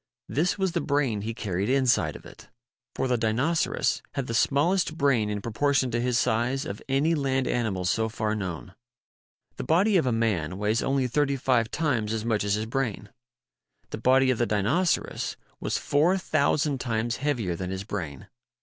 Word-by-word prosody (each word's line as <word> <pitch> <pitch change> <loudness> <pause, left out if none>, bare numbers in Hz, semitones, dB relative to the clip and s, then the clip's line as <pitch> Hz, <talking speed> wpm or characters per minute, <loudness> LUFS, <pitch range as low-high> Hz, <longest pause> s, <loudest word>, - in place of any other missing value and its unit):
This 170 +8 0
was 190 -2 0
the 170 -1 -1
brain 140 -8 0
he 110 +2 -4
carried 100 -1 -2
inside 130 - +2
of - - -11
it. - - -14 0.5
For 130 - 0
the 125 -2 +1
Dinoceras 125 +9 0
had 140 - -1
the 115 - -4
small 140 +9 +3
est 165 -4 -1
brain 130 -8 +2
in 105 -1 -3
proportion 130 +2 +1
to 120 +1 0
his 125 -1 +1
size 125 +4 0
of 100 - -6
any 140 +5 +2
land 135 -3 0
animal 105 -7 -1
so 110 +5 +1
far 110 -1 -2
known. 95 -2 -5 0.8
The - - -4
body 185 +9 +3
of 160 - +1
a - - +2
man 100 -8 0
weighs 105 +3 0
only 135 -1 +1
thirty 140 +2 +1
five 125 -4 +1
times 125 -9 -1
as 110 0 -3
much 110 -3 +1
as 100 0 +1
his 110 +1 -2
brain. 115 -4 -3 0.8
The - - -5
body 130 +2 +4
of 125 - -2
the 120 - +2
Dinoceras 130 - 0 0.2
was - - -1
four 160 +7 +2
thousand 150 -4 +1
times 120 0 -1
heavier 125 -11 -1
than 90 +1 -5
his 95 +1 -4
brain. 85 - -6
120 Hz, 185 wpm, -26 LUFS, 105-140 Hz, 0.8 s, body